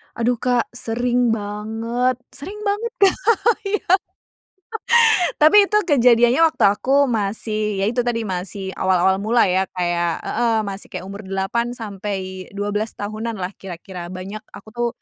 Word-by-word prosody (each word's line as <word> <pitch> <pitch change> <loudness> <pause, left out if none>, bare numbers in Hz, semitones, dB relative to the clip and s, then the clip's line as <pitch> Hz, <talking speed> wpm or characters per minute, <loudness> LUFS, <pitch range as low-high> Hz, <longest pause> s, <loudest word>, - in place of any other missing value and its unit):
Aduh, 235 0 0
Kak, 245 -1 +1
sering 245 0 0
banget 225 +4 -2 0.2
sering 330 +10 -8
banget, 420 +3 -1
Kak, 385 0 +3 0.4
iya. 420 +1 -1 1.6
Tapi 310 +7 +6
itu 420 - +3
kejadiannya 245 -1 +4
waktu - - -2
aku 270 +8 +2
masih 215 -2 -2
ya 195 - +1
itu 245 +2 +1
tadi 230 -2 -1
masih 190 +1 -4
awal-awal 190 +1 +2
mula 235 +2 +3
ya, 185 +1 +2
kayak 175 -2 -1
heeh, 230 0 +1
masih 195 0 -7
kayak 185 - -6
umur 200 +1 -8
8 195 +5 -2
sampai 195 -4 -6
12 205 +2 -2
tahunanlah 210 -2 -4
kira-kira, 180 -1 -8
banyak 195 +4 -7
aku - - -13
tuh 240 0 0
215 Hz, 135 wpm, -21 LUFS, 195-245 Hz, 1.6 s, Tapi